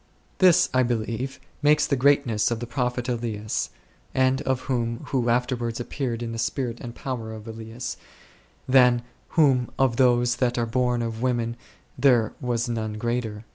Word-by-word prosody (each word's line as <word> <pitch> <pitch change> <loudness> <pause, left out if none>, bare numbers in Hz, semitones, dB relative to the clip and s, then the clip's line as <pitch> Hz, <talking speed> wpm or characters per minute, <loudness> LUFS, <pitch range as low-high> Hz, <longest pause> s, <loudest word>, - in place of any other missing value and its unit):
This, 185 -3 +6
I 130 - +4
believe, 120 +2 -2 0.2
makes 150 +1 +4
the 140 - +1
greatness 130 -5 +3
of 120 -1 -2
the 120 - -4
prophet 125 0 -2
Elias, 115 -4 -2 0.5
and 130 +1 +3
of 130 -1 0
him 115 -3 -1
who 125 -4 +1
afterwards 120 -1 0
ap 120 - -6
peared 120 -4 -2
in 115 - -4
the 115 - -5
spirit 120 0 -2
and 120 -2 -7
power 120 -4 -5
of 110 0 -9
Elias, 115 +2 -6 0.7
than 125 -2 +5 0.3
whom 135 -6 +4
" - - -27
of 130 -3 +2
those 120 -2 +3
that 125 -1 +1
are 120 - +1
born 120 0 0
of 115 -1 -4
women 120 -2 0 0.4
there 120 -6 +4
was 120 -1 -1
none 110 -2 -2
greater 115 0 -2
s." 105 - -12
120 Hz, 175 wpm, -25 LUFS, 115-130 Hz, 0.7 s, This